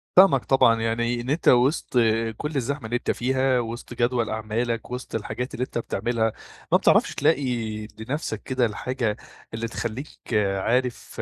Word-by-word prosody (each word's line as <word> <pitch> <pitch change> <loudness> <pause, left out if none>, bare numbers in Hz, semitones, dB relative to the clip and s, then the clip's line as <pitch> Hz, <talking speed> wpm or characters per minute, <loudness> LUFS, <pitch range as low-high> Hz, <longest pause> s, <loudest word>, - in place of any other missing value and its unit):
فاهمك 185 -8 +6
طبعًا، 115 -4 +4
يعني 120 +1 0
إن 125 - -6
أنت 155 +4 -1
وسط 130 +5 +4 0.4
كل 150 0 -4
الزحمة 135 0 -2
اللي 120 +2 -2
أنت - - -1
فيها، 130 0 +1
وسط 120 +1 -5
جدول 120 -1 +1
أعمالك 110 +2 -2
وسط 125 -2 -5
الحاجات 125 +4 -4
اللي 125 - -2
أنت - - -6
بتعملها، 115 0 -1 0.4
ما - - +7
بتعرفش - - +3
تلاقي 140 - +2 0.6
لنفسك 115 -2 -4
كده 130 -2 +1
الحاجة 115 0 -2 0.4
اللي 115 +1 -2
تخليك 115 +5 -5 0.4
عارف 125 +5 -1
120 Hz, 150 wpm, -25 LUFS, 115-130 Hz, 0.6 s, ما